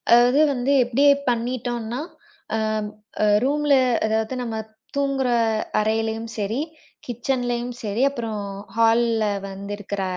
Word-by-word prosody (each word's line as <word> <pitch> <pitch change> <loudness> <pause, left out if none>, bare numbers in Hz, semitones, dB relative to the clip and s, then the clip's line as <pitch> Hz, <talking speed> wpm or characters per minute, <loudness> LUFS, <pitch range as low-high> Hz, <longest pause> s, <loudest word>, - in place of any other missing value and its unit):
அதாவது 245 +4 +5
வந்து 255 +1 0
எப்டி 245 +3 +1 0.3
பண்ணிட்டோன்னா, 240 0 -2 0.6
அம் 215 -1 -1 0.5
ரூம்ல 295 +2 +2 0.3
அதாவது 220 +2 0
நம்ம 230 -2 -3 0.4
தூங்குற 275 -2 +1 0.5
அறையிலயும் 225 +1 -1
சரி, 215 +5 -1 0.5
கிச்சன்லயும் 245 0 -2
சரி, 210 +2 -1
அப்புறம் 230 -6 -4 0.4
ஹால்ல 230 0 +3 0.2
வந்து 195 +1 -7
இருக்கற 200 -1 -4
230 Hz, 100 wpm, -23 LUFS, 220-250 Hz, 0.6 s, அதாவது